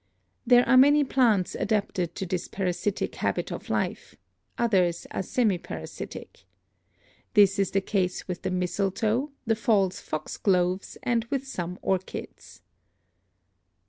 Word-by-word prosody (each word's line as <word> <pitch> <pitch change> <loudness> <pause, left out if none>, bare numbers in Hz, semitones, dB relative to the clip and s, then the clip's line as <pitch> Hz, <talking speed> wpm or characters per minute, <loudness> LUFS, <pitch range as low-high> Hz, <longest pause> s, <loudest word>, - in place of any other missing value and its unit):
There 245 0 +6
are 260 - +6
many 290 +3 +6
plants 235 -9 +2
adapted 190 -5 -1
to 190 - -3
this 180 0 -3
para 190 -2 -1
sitic 200 +3 -2
habit - - -2
of - - -7
life; - - -2 0.4
others 185 -7 +1
are - - -2
semi 205 -1 +1
parasitic. - - -8 0.9
This 200 -1 +5
is 195 - +2
the 195 - +1
case 185 -2 -1
with 180 -2 -4
the 190 - -2
mistletoe, 200 +8 0 0.2
the 225 -1 +2
false 205 -4 +1
foxgloves 180 +3 -1
and 235 -2 +1
with 275 +2 -3
some 180 -7 -4
orchids. 190 -1 -4
195 Hz, 130 wpm, -27 LUFS, 180-230 Hz, 0.9 s, There